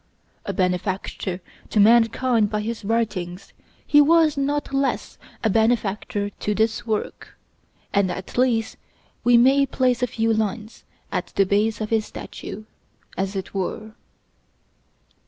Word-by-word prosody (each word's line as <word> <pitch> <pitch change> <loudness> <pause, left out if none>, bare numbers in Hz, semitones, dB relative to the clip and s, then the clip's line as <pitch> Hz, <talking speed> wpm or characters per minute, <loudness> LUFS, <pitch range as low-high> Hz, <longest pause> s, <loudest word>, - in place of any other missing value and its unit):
A - - 0
benefactor 185 0 -2 0.3
to 215 - +1
mankind 230 +1 +4
by 210 0 -1
his 225 +1 -4
writings, 200 -4 -2 0.3
he 295 - +6
was 320 0 +4
not 285 0 -1
less 275 0 -1 0.2
a 220 - +3
benefactor 215 -1 0
to 210 +1 -3
this 220 +2 0
work, 215 -1 -4 0.6
and 200 -2 +2
at 185 +1 -6
least 240 -3 +1 0.5
we 245 0 +6
may 270 +3 +5
place 255 -2 +1
a 250 - +2
few 225 -1 0
lines 220 +1 -3 0.3
at - - -2
the 195 - +4
base 210 +3 +1
of 215 - -4
his 220 -1 +1
statue, 215 - -8 0.5
as 195 +1 -2
it 190 -1 -5
were. 210 +3 -4
220 Hz, 135 wpm, -23 LUFS, 200-245 Hz, 0.6 s, he